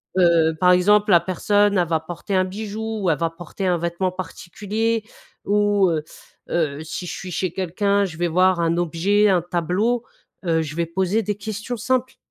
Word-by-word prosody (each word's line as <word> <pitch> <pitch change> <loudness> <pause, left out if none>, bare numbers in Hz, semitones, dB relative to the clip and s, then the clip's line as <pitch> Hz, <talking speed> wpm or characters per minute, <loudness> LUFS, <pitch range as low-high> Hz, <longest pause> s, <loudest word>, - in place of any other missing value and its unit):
Heu, 170 -3 +4
par 180 +1 +5
exemple 205 +3 +4
la 175 - +7
personne, 205 +3 +1
elle 175 -2 +2
va 160 -1 +1
porter 175 +5 -5
un 185 0 +3
bijou 215 +3 -5
ou 180 - +2
elle 155 - +2
va 165 0 0
porter 175 +3 -7
un 180 -1 +2
vêtement 170 +2 -1
particulier 210 +5 -3 0.4
,ou 205 -1 +3
heu 155 -2 -1 0.5
heu, 155 -4 -1
si 165 +3 -6
je - - -5
suis 185 - -7
chez 180 +1 -1
quelqu'un, 200 +3 0
je 175 -4 -7
vais 175 +1 0
voir 185 +2 +3
un 165 0 +1
objet, 175 +5 +2
un 185 -3 +3
tableau, 180 +8 0 0.4
heu, 165 -2 +2
je 155 -1 -5
vais 170 - +1
poser 190 +5 0
des 210 +1 -2
questions 215 +3 -5
simples. 255 +3 -1
185 Hz, 190 wpm, -22 LUFS, 170-205 Hz, 0.5 s, la